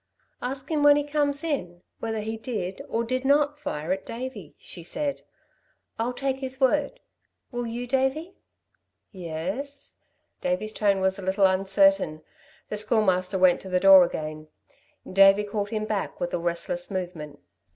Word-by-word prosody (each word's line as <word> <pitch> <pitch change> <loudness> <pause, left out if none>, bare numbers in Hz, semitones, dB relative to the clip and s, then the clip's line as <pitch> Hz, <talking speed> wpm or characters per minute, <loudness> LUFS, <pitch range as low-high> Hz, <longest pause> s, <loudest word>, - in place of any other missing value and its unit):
"Ask 265 +3 -5
him 305 -2 +1
when 290 0 +7
he 290 - +1
comes 290 0 0
in, 180 - -3 0.2
whether 225 -1 -3
he 220 +1 -4
did, 215 -6 -4
or 230 - 0
did 255 +2 -2
not 290 +2 +2
fire 170 - -4
at 190 +1 -1
Davey," 230 - -7
she 175 - -9
said. 285 - -3 0.8
"I'll 235 +2 0
take 265 +1 -2
his 265 0 -4
word. 290 - +1 0.5
Will 245 -1 -3
you, 235 +2 -4
Davey?" 265 +7 0 0.8
"Yes." 190 - -6 0.4
Davey's 270 -6 -1
tone 200 -3 +2
was 190 +1 +1
a - - -6
little 190 +1 +2
uncertain. 190 -4 +3 0.5
The 210 - -3
Schoolmaster 195 -3 +2
went 185 -1 +4
to 190 - -9
the 180 0 +2
door 195 -1 +9
again. 155 -2 -4 0.6
Davey 195 +2 +6
called 205 0 -3
him 215 -1 -2
back 210 -2 -3
with 175 - -3
a - - 0
restless 175 +1 -2
movement. 175 -6 -5
215 Hz, 155 wpm, -26 LUFS, 185-265 Hz, 0.8 s, door